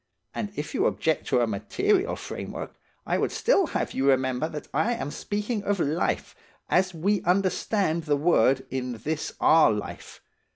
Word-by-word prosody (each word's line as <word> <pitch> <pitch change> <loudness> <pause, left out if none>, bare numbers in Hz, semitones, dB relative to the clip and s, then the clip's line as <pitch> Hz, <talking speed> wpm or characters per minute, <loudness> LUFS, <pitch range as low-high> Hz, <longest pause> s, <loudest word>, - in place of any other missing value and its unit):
And 205 -2 -4
if 150 - -5
you - - +2
object 160 -1 -1
to 125 - +2
a - - +3
material 385 - 0
framework, - - -6 0.3
I - - 0
would - - 0
still 395 -7 +2
have - - -2
you 135 +1 +2
remember 130 +2 +1
that 150 -2 -7
I 240 +2 +1
am 145 - -4
speaking 210 +5 -3
of 200 -1 0
life, 160 +2 -1 0.4
as 185 +1 +3
we 190 +4 0
understand 185 -2 +1
the 145 -2 +2
word 135 -4 +3
in 125 -1 -3
this 150 +7 -4
our 160 -7 +6
life. 105 -1 -6
160 Hz, 165 wpm, -26 LUFS, 135-205 Hz, 0.4 s, our